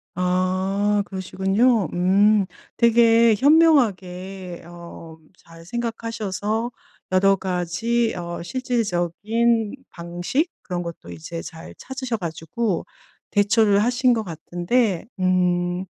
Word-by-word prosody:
아 185 +3 +1
그러시군요. 195 +4 +1
음. 200 +3 +3 0.3
되게 230 -1 +5
현명하게 195 - +2
어 170 0 -11 0.4
잘 165 0 -16
생각하셔서 230 0 -3 0.4
여러 195 +1 +4
가지 190 +6 -1
어 170 -1 -5
실질적인 225 0 0 0.2
방식 175 - -2
그런 175 -2 -4
것도 170 - -8
이제 85 - -7
잘 165 0 -10
찾으셔 260 -3 -5
가지고 180 +3 -3 0.5
대처를 205 0 +3
하신 250 +1 +3
것 225 -2 -1
같은데 175 +4 -1
음 180 0 +1
195 Hz, 205 characters per minute, -22 LUFS, 175-230 Hz, 0.5 s, 되게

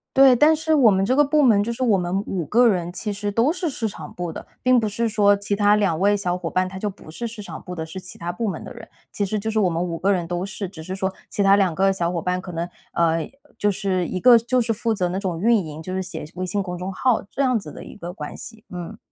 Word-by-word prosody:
对， 270 -2 +7
但 300 +6 +5
是 315 0 0
我 250 -7 +6
们 190 0 +2
这 255 - +2
个 295 - +6
部 300 +1 +2
门 220 -7 +5
就 235 - -2
是 235 +2 -3
我 220 -6 +4
们 180 +1 -1
5 180 -4 -2
个 235 +10 +4
人 175 -5 0
其 210 +3 -4
实 205 0 -3
都 230 +8 +3
是 360 -2 -2
市 240 -5 -2
场 160 -7 -9
部 175 -1 -4
的， - - -8 0.2
并 255 0 +4
不 220 -3 +1
是 230 +3 -1
说 205 -2 +4
其 205 0 -2
他 205 0 +4
2 195 -6 +1
位 205 +3 +3
小 180 -3 -1
伙 175 -2 -4
伴 185 +2 +1
他 190 +1 -8
就 210 +2 -2
不 195 -5 -13
是 200 +9 -5
市 225 -2 -6
场 200 - -8
部 180 - -7
的， 160 -2 -4
是 160 +3 -9
其 185 -1 -9
他 170 - -5
部 205 +5 -2
门 175 - -5
的 - - -8
人。 230 -2 -12 0.2
其 205 - -1
实 210 +2 -2
就 220 +2 -3
是 220 - -2
我 200 -4 +3
们 165 0 -1
5 170 -2 -2
个 195 +4 +1
人 175 -4 0
都 175 +1 -2
是， 195 0 -5
只 170 -4 -10
是 185 +3 -5
说 190 0 -1 0.2
其 - - -2
他 195 0 +6
2 195 -4 +2
个 195 +3 +2
小 175 -2 -1
伙 170 -2 -2
伴 180 +2 -1
可 185 - -8
能， 170 0 -3 0.3
呃， 165 -1 +1 0.3
就 205 -1 +2
是 185 -2 -1
一 185 - -3
个 245 +3 +8
就 240 +3 +1
是 230 -1 +1
负 225 +1 -1
责 185 -4 0
那 180 +2 -3
种 185 -4 -3
运 230 +5 +4
营， 155 0 -8
就 185 +3 -6
是 190 - -1
写 185 -4 -6
微 185 0 -3
信 200 +3 -1
公 180 -2 -5
众 180 +2 -4
号 240 +5 +1
这 - - -2
样 255 -3 +3
子 160 -8 -7
的 - - -10
一 - - -11
个 175 -3 -7
关 150 -5 -7
系， 225 -1 -9
嗯。 175 -2 -7
195 Hz, 310 characters per minute, -23 LUFS, 180-225 Hz, 0.3 s, 个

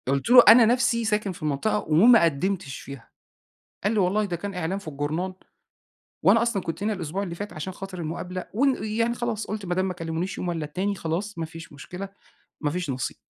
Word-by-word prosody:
قُلت 140 - 0
له: 245 0 +10
"أنا 230 +2 +9
نفسي 240 0 +2
ساكن 210 -2 0
في 175 - -11
المنطقة 155 +9 0
وما 215 +8 +7
قدِّمتش 165 -2 -1
فيها." 140 -4 -10 0.8
قال 205 - +2
لي: - - +1
"والله 195 +3 +2
ده 180 -4 -3
كان 200 +3 -6
إعلان 180 +2 -2
في 200 - -10
الجرنان، 155 +6 -2 0.9
وأنا 230 - +5
أصلًا 230 -5 0
كنت 165 +4 -5
هنا 215 +1 +1
الأسبوع 185 0 -3
اللي 175 -4 -4
فات 205 +4 -6
عشان 155 +5 -5
خاطر 190 0 -8
المقابلة 175 +3 -5
ون 265 0 +1
يعني 230 +2 0
خلاص، 235 -3 -3
قُلت 210 -2 -5
ما 175 - -1
دام 185 +1 0
ما 185 - -3
كلِّمونيش 165 +2 -4
يوم 180 - -3
والّا 165 -3 -2
التاني، 185 +7 -2
خلاص 190 +3 -4
ما 165 - -2
فيش 165 0 -11
مشكلة، 180 +7 -8 0.5
ما 145 -2 0
فيش 175 -1 -3
نصيب." 130 -1 -3
185 Hz, 210 wpm, -25 LUFS, 165-210 Hz, 0.9 s, له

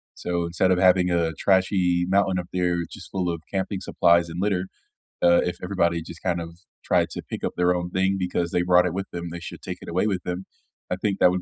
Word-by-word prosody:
So, 85 -1 -2
instead 90 +2 +1
of 90 - +3
having 90 0 +4
a 85 -2 +1
trashy 95 -2 +2
mountain 95 -1 +2
up 90 - -6
there 90 -1 +1
just - - -9
full 90 -2 -1
of 85 -2 -3
camping 95 0 -2
supplies 85 0 +3
and 85 +2 -5
litter, 95 -2 0 0.5
uh, 85 0 +5
if 90 0 -2
everybody, 85 -3 +1
just, 85 +1 -10
kind 90 -2 0
of, 85 +1 -9 0.2
tried - - +2
to - - -5
pick - - -7
up - - 0
their 90 0 +3
own 90 0 -3
thing 95 +1 +1
because 90 -2 -1
they 90 - +1
brought 90 0 +5
it 90 - -1
with 95 +1 -3
them, 85 0 -5
they 85 - -6
should 85 - -9
take - - -5
it - - -9
away 90 +5 +1
with 95 -4 -1
them. 90 +1 -4 0.4
I 90 - 0
think 100 +1 -2
that - - +6
would 90 - -1
90 Hz, 240 wpm, -24 LUFS, 85-95 Hz, 0.5 s, that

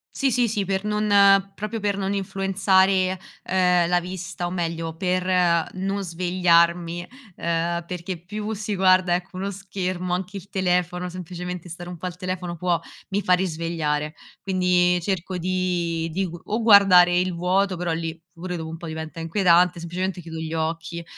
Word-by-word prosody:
Sì, 275 -2 +1
sì, 245 0 +2
sì, 205 -3 -1
per 195 +1 -1
non 200 -2 +4
proprio 215 +3 -4
per 205 -1 0
non 200 0 -2
influenzare, 190 -1 +2 0.2
ehm, 180 -2 +3
la 175 0 +3
vista 180 0 -5
o - - -3
meglio 165 -2 -3
per 180 -2 +1
non 195 +1 -2
svegliarmi, 175 -1 +2 0.3
ehm, 170 0 -1
perché 180 0 -5
più 210 +5 -5
si 210 0 -3
guarda 185 -1 +4
ecco 185 +1 -3
uno 200 +1 -3
schermo, 185 -2 -3
anche 190 +2 -5
il 195 +2 -11
telefono, 180 -2 0
semplicemente 180 0 -6
stare 175 +2 -8
un 180 - -7
po' 180 +3 -5
al 180 0 -7
telefono 180 -1 -4
può 175 -1 +1 0.3
mi 200 +2 0
fa 180 - +3
risvegliare. 160 -4 -1 0.3
Quindi 180 -2 +2
cerco 185 0 -2
di 175 -2 -1
di 190 +2 -1 0.2
o 215 +3 -1
guardare 190 -5 +7
il 180 -1 -1
vuoto, 185 +2 +1
però 175 -1 -2
lì 165 0 -3 0.2
pure 180 0 -4
dopo 160 -1 -5
un 165 - -6
po' 170 - -8
diventa 160 +1 -6
inquietante, 175 0 +3
semplicemente 180 +2 -3
chiudo 160 -1 -8
gli 160 0 -4
occhi, 165 +1 -3
180 Hz, 165 wpm, -24 LUFS, 170-190 Hz, 0.3 s, guardare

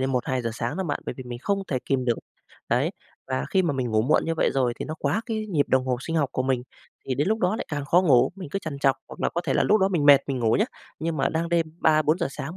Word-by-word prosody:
đến 130 +1 0
1:00-2:00 125 -1 -1
sáng 120 +4 -3
đó 190 - -2
bạn, 145 - -2
bởi - - -3
vì 130 - -6
mình 120 -1 -6
không 195 +7 -1
thể 130 - 0
kìm 130 -2 0
được. 120 -2 +1 0.5
Đấy, - - +2 0.4
và 130 0 -2
khi 190 -1 +3
mà 165 -4 +1
mình 130 -3 -2
ngủ 110 0 +2
muộn 140 - +2
như 165 - -1
vậy 160 - +2
rồi 125 -3 +2
thì - - -3
nó 155 - -5
quá 145 +9 0
cái 220 -2 -3
nhịp 155 -8 0
đồng 130 0 +2
hồ 125 -1 +1
sinh 165 +5 -3
học 145 -4 +2
của 130 - 0
mình, 130 -2 0 0.4
thì 130 - -2
đến 145 +8 0
lúc 220 - +1
đó 190 +2 +1
lại - - -4
càng 145 -2 -3
khó 175 +6 +4
ngủ, 135 -6 +4
mình 185 -5 -7
cứ 195 - -1
trằn 155 -6 -6
trọc, 135 -1 +3
hoặc - - -11
là - - +2
có 175 - +1
thể - - 0
là - - +3
lúc 215 0 +3
đó 190 - +4
mình 170 -7 0
mệt 140 -1 +9
mình 135 -2 -2
ngủ 115 -2 +2
nhá, 210 - +3 0.3
nhưng 165 0 -2
mà 135 -1 +1
đang 165 +1 -1
đêm 170 -1 +2
3:00-4:00 155 +2 +3
sáng 165 +5 -6
145 Hz, 300 wpm, -25 LUFS, 130-170 Hz, 0.5 s, mệt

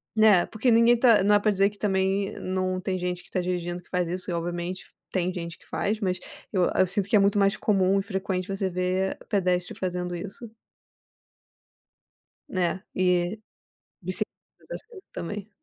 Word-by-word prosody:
Né, 215 -5 +6
porque 230 +2 +1
ninguém 230 +1 +6
tá 230 -5 +5
não 205 +1 +5
é - - +5
pra 215 +1 +2
dizer 195 +1 +3
que 205 - -17
também 195 0 0
não 185 0 -1
tem 185 -1 -1
gente 180 0 -3
que - - -20
tá 185 - 0
dirigindo 175 -1 -3
que - - -27
faz 180 -2 0
isso, 180 +1 -4
e - - -1
obviamente 175 +2 -3 0.3
tem 185 -1 0
gente 170 -1 -6
que - - -24
faz, 210 +2 -1
mas 185 -3 -1 0.3
eu 185 -4 +3
eu 185 - +4
sinto 195 +1 0
que 215 - +2
é - - +7
muito 200 +1 +3
mais 195 +1 +3
comum 195 -2 +2
e - - -2
frequente 190 -2 -2
você 195 -1 -1
ver 185 +1 -1
pedestre 180 -3 0
fazendo 180 -1 -3
isso. 200 +6 -7 2.0
Né? 185 +1 -1
E 180 +2 +1 0.6
bicicletas, - - 0 0.3
mas - - -20
acho - - -5
que 430 -6 -12
também. 205 +4 -5
190 Hz, 185 wpm, -26 LUFS, 180-205 Hz, 2.0 s, é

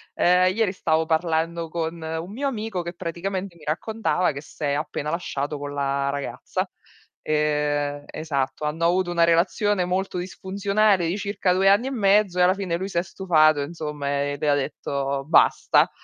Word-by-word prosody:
ehm, 180 +1 +4
ieri 220 -4 +2
stavo 160 -4 0
parlando 165 0 0
con 165 0 -3
un 160 +3 -4
mio 275 +7 -2
amico, 220 -7 -3
che 170 0 -6
praticamente 185 +2 -4
mi 160 - -18
raccontava 180 +3 0
che 140 - -7
s'è 145 -1 -4
appena 150 0 -3
lasciato 150 -3 -3
con 145 0 -5
la 140 -1 0
ragazza. 140 0 -3 0.5
Ehm 150 -1 0
esatto, 150 -2 -3
hanno 160 +3 -1
avuto 175 +1 +2
una 170 -1 +3
relazione 185 +3 +2
molto 185 +1 -2
disfunzionale 195 +1 +1
di 175 +4 -1
circa 200 -3 0
2 190 +1 +4
anni 205 +6 +4
e - - -3
mezzo 200 -5 +3
e - - +5
alla 180 +1 +5
fine 190 -3 -2
lui 190 +2 -4
si 180 - -4
è 170 - +2
stufato 155 -6 +3
insomma, 150 -1 -5
e 145 0 -2
le 150 - 0
ha 145 - +4
detto 140 -1 -2
basta. 165 - +4
170 Hz, 170 wpm, -24 LUFS, 150-190 Hz, 0.5 s, e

